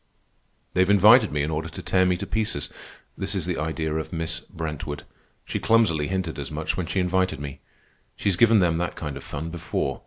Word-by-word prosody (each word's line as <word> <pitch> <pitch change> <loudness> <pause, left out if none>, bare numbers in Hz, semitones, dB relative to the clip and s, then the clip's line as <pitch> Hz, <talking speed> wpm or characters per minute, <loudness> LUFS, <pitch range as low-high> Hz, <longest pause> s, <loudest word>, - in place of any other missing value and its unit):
"They've 95 +1 +3
invited 105 +3 +7
me 75 -1 0
in 75 - -2
order 80 +1 -2
to - - -8
tear 95 -1 +3
me 90 -1 +2
to - - -4
pieces. 105 -6 -2 0.4
This 100 - -3
is 95 -4 -1
the 90 -1 -2
idea 80 0 -2
of 80 0 -3
Miss 80 0 -2
Brentwood. 80 -4 -6 0.4
She - - -3
clumsily 105 -10 +3
hinted 90 -5 -2
as 70 - -4
much 80 +1 -2
when 90 -3 -3
she 95 - 0
invited 95 -2 +1
me. 70 -2 -7 0.6
She's 100 -3 +1
given 115 +1 +5
them 85 -2 +2
that 90 - -2
kind 75 -3 -5
of 70 - -8
fun 80 +3 -5
before. 75 -5 -2
85 Hz, 205 wpm, -25 LUFS, 75-95 Hz, 0.6 s, invited